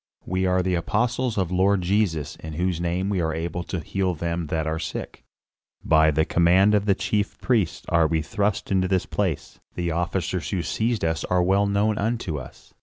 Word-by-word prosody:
"We 95 +1 0
are 90 0 +2
the 90 0 0
apostles 120 +7 0
of 95 -4 0
the - - -5
Lord 95 +1 +3
Jesus, 85 -6 0
in 80 -1 -8
whose 90 +1 -1
name 90 +2 -1
we 100 -3 0
are 80 -1 -1
able 85 +2 -3
to 90 - -4
heal 95 +3 -1
them 85 0 -3
that 80 0 -1
are 80 +1 -2
sick. 80 - -6 0.6
By 80 0 +5
the 80 +1 +2
command 90 +5 +4
of 105 -1 +2
the 100 -2 +3
chief 105 +1 -1
priests 110 -9 0
are 85 -2 +3
we 80 -1 0
thrust 100 +5 -1
into 95 -1 +2
this 95 -1 +1
place; - - -3 0.2
the 85 -1 -1
officers 85 +1 -2
who 90 -4 -1
seized 115 0 -1
us 80 0 -1
are 90 -1 +2
well 100 +3 +3
known 105 +2 +1
unto 105 -8 -1
us. 65 -1 -13
90 Hz, 200 wpm, -24 LUFS, 80-100 Hz, 0.6 s, By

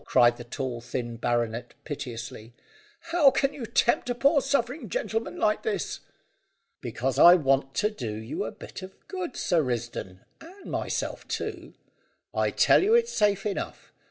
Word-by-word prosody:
cried 120 -2 +4
the 120 - -8
tall 120 0 -4
thin 120 0 -4
baronet 120 0 -1
piteously, 120 -5 -7 0.6
"how 325 -5 +6
can 275 +1 +1
you 240 -5 -6
tempt 240 +2 +2
a 245 - 0
poor 280 +4 +4
suffering 270 +1 -1
gentleman 230 - -2
like 215 0 +2
this?" 200 -5 -2 0.8
"Because 130 +1 -2
I 175 +1 +10
want 135 -4 +1
to 210 +1 +1
do 120 - -5
you 110 +4 -4
a - - -4
bit - - -10
of 185 +1 -10
good, 365 -7 -5
Sir 170 -3 +2
Risdon, 120 -7 -4 0.2
and 375 +5 -12
myself - - -3
too. - - -5 0.6
I - - +1
tell - - +5
you 430 +4 +4
it's 475 0 +3
safe 205 -2 +2
enough. 205 - -4
175 Hz, 155 wpm, -27 LUFS, -, 0.8 s, I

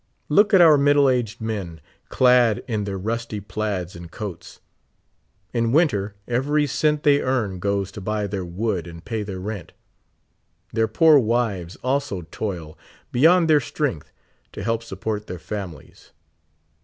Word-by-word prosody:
Look 205 +8 +4
at 190 -3 +7
our 155 -4 +7
fniddle 140 -1 +4
aged 120 -2 -3
men, 100 -7 -4 0.3
clad 125 -4 +4
in 110 -4 -2
their 100 -1 -3
rusty 110 +2 -3
plaids 100 -3 -4
and 85 -1 -10
coats. 100 -1 -8 0.9
In 115 -1 +1
winter, 105 - +2
every 145 +5 +1
cent 150 +2 0
they 145 -1 +4
earn 110 -8 -1
goes 100 0 -1
to 105 - -9
buy 105 +1 -2
their 100 -1 -3
wood 90 0 -2
and 85 0 -11
pay 115 -2 -3
their 100 -2 -5
rent; 100 -2 -6 1.0
their 110 0 +2
poor 155 +6 +5
wives 110 -7 -1
also 130 -8 -1
toil 85 -8 -5 0.3
beyond 165 +7 +5
their 155 -2 +5
strength, 130 - -3 0.4
to - - -6
help 115 +1 0
support 105 0 -5
their 90 - -6
families. 95 -4 -8
110 Hz, 145 wpm, -23 LUFS, 95-130 Hz, 1.0 s, at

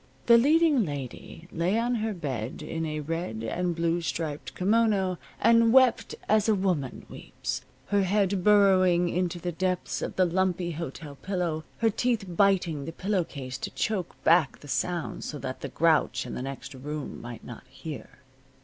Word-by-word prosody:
The 235 -1 +7
leading 300 -1 +4
lady 145 +2 -7
lay 175 +6 0
on 240 +2 +1
her 220 -2 -1
bed 135 - -4
in 165 0 -3
a 155 0 -3
red 155 -8 -4
and 175 +9 -1
blue 170 +1 0
striped 145 -6 -4
kimono 200 -2 +2 0.2
and 230 +1 +5
wept 260 -1 +4
as 215 0 +3
a 215 - +4
woman 180 -9 -1
weeps, - - -5 0.3
her 205 -1 +3
head 195 -1 +1
burrowing 185 -4 +5
into 180 0 -1
the 175 +1 -3
depths 185 +1 -2
of - - -4
the 185 - +4
lumpy 180 0 0
hotel 150 -2 -7
pillow, 175 -5 -2
her 225 -1 +2
teeth 235 -1 0
biting 175 -5 +2
the 165 - -5
pillow 190 +2 0
case 130 -5 -7
to - - -4
choke 200 -6 -2
back 165 -4 +4
the 145 - -12
sounds 175 +3 -2
so 150 - -5
that 130 -2 -6
the 140 - -4
grouch 150 -4 +2
in 125 - -6
the - - -4
next 135 +2 -6
room 145 +3 -6
might 120 -2 -8
not 120 - -10
hear. 140 -5 -9
175 Hz, 170 wpm, -27 LUFS, 150-200 Hz, 0.3 s, The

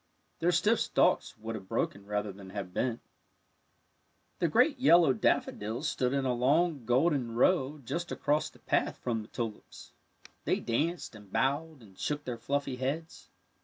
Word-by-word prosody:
Their 175 +2 +3
stiff 210 +7 +3
stalks - - +2
would 110 +1 -5
have 100 -4 -7
broken 100 +1 -2
rather 105 0 -2
than 95 0 -12
have 95 -2 -6
bent. 120 +1 -1 1.4
The 170 - +2
great 250 - +3
yellow 170 - +6
daffodils 115 +4 0
stood 125 -3 0
in 135 -1 0
a 125 - +2
long 140 +3 +2
golden 125 -1 +2
row 140 +2 +3
just 170 +8 -3
across 150 +1 0
the - - -20
path - - 0
from 115 -3 -2
the 105 - -11
tulips. 115 -3 -7 0.5
They - - +1
danced 155 +9 -1
and 105 -3 -14
bowed 145 +1 -1
and 95 -3 -17
shook 145 0 -2
their 120 -3 -5
fluffy 140 -2 -2
heads. 145 +6 -4
130 Hz, 160 wpm, -30 LUFS, 115-160 Hz, 1.4 s, yellow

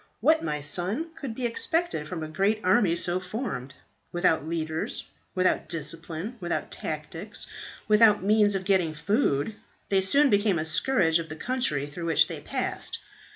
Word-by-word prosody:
What, 315 +1 +3
my 150 -1 -2
son, 185 - -2
could 255 -6 -6
be 255 - -3
expected 320 - -1
from 165 -1 -5
a - - -4
great 195 +7 +1
army 185 -2 +3
so 175 +1 +1
formed? 180 - -5 0.4
Without 175 -4 +2
leaders, 160 -1 -3 0.3
without 185 0 +1
discipline, 165 - -2
without 175 -2 -3
tactics, 160 +6 -2 0.4
without 210 -2 +5
means 205 0 +4
of 190 -1 -3
getting 180 -5 +2
food, 200 - 0 0.3
they 195 -1 +3
soon 280 +9 +5
became 205 -2 +3
a 155 - -1
scourge 165 0 +2
of 165 -1 -6
the 155 - -6
country 160 - -1
through 150 +4 -7
which 165 -2 +4
they - - -6
passed. - - -3
180 Hz, 155 wpm, -27 LUFS, 160-215 Hz, 0.4 s, without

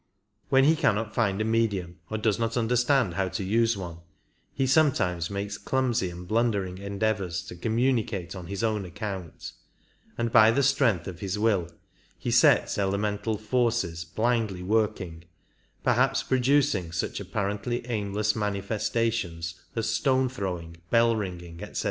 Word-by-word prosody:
When 135 0 +5
he 155 +4 +5
cannot 110 -8 +1
find 100 -4 +1
a - - 0
medium 100 -7 0
or 110 - -2
does 110 0 +1
not 115 +1 -1
understand 120 -2 +2
how 95 +1 0
to 95 - -3
use 115 +3 +2
one 85 -3 -6 0.5
he 135 - 0
sometimes 105 - +2
makes 100 0 -4
clumsy 125 -7 0
and 90 +1 -9
blundering 100 -4 0
endeavours 100 -3 -1
to 95 - -9
communicate 110 -3 0
on 90 -2 -8
his 100 +3 -4
own 110 -3 0
account, 95 -2 -6 0.7
and 115 -1 -1
by 110 -1 +7
the 140 +5 +2
strength 130 - +2
of 90 -2 -7
his 100 0 -3
will 105 -6 +1 0.5
he - - -3
sets - - +4
elemental 105 +2 -1
forces 110 -7 0
blindly 110 +1 -1
working, 95 -5 -1 0.6
perhaps 130 +2 +2
producing 130 - +2
such 85 - -2
apparently 105 +4 -3
aimless 105 -2 -1
manifestations 105 -3 -1 0.2
as 115 -1 -1
stone 130 +4 +2
throwing, 90 -8 -5
bell 115 0 +4
ringing, 90 -5 -6
etc. - - -8
105 Hz, 140 wpm, -27 LUFS, 95-115 Hz, 0.7 s, by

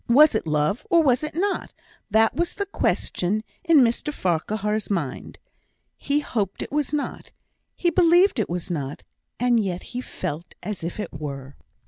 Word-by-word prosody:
Was 295 +6 +7
it 220 - -1
love, 150 +8 +1
or 335 -2 +5
was 255 -1 +3
it 305 0 -4
not? 390 +3 -1 0.4
that 220 +1 +4
was 345 +1 -1
the 400 - -2
question 215 - 0 0.2
in 330 -5 +6
Mr 240 +5 +1
Farquhar's 210 - -1
mind. 165 -10 -3 0.6
He 290 +1 0
hoped 205 -9 -2
it - - -9
was 295 -1 0
not; 295 -2 -3 0.5
he 345 - +1
believed 350 - +5
it 215 - 0
was 175 +1 -3
not; 145 -4 -4 0.4
and 240 -2 +3
yet 180 -2 -3
he 250 - -2
felt 165 -8 -6
as 205 -5 -5
if 170 +5 -4
it 210 - -4
were. 140 -2 -6
220 Hz, 165 wpm, -24 LUFS, -, 0.6 s, Was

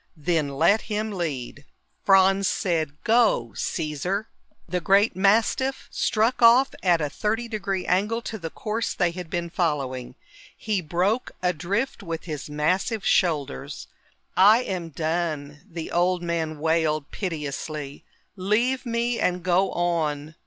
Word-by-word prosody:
"Then 155 -1 0
let 200 +8 +4
him 215 +1 -1
lead." 145 -7 -4 0.4
Franz 195 0 +5
said, 160 -5 -1
"Go, 220 - +3
Caesar." 175 +7 -2 0.4
The 180 -1 -2
great 200 +4 +3
mastiff 225 +7 +2
struck 225 +4 +1
off 240 +3 +6
at 175 -3 +3
a 150 - 0
thirty 220 +10 -2
degree 200 -4 -3
angle 210 +5 +1
to 220 - -5
the 165 -2 -5
course 220 +6 -3
they 175 -2 +1
had 175 -1 -7
been 170 0 -3
following. 140 -8 -2 0.4
He 210 -4 -1
broke 180 +9 0
a 180 0 +2
drift 200 - -2
with 165 -4 -5
his 150 -4 -6
massive 185 +8 0
shoulders. 150 - 0 0.5
"I 215 +6 +6
am 180 -6 -4
done," 155 -2 -2
the 165 -2 -6
old 175 +1 +1
man 165 -2 -2
wailed 155 -1 0
piteously. 150 -4 -5 0.3
"Leave 230 +7 0
me 235 0 0
and 180 -1 0
go 185 +2 +2
on." 155 -4 -1
180 Hz, 135 wpm, -25 LUFS, 155-210 Hz, 0.5 s, off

